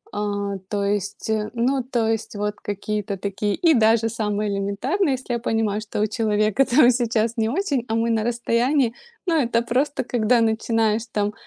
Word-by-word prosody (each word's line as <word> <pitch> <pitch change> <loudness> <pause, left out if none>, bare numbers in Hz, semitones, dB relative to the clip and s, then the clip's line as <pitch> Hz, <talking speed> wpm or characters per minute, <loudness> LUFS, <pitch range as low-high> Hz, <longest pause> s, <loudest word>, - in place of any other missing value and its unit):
А, 205 -1 -2
то 205 -1 -1
есть, 205 0 -2 0.3
ну 255 +3 +1
то 240 -3 -1
есть, 225 -1 -2
вот 210 0 -2
какие-то 205 0 -3
такие. 200 +1 -2
И 335 -2 +4
даже 225 -2 +3
самое 210 -2 -2
элементарное, 255 - 0
если 260 -1 -4
я 235 - -1
понимаю, 225 -2 0
что 215 -1 -4
у - - +3
человека, 215 +2 +1
там, 255 0 +5
сейчас 230 -2 0
не 220 - +1
очень, 285 - -1
а 225 - -1
мы 230 +1 +1
на 220 -1 +1
расстоянии, 240 +2 +1 0.3
ну 335 -3 +2
это 235 -2 +1
просто 265 +5 0
когда 240 -1 +2
начинаешь 225 0 +1
там, 210 0 -1
225 Hz, 175 wpm, -22 LUFS, 210-240 Hz, 0.3 s, там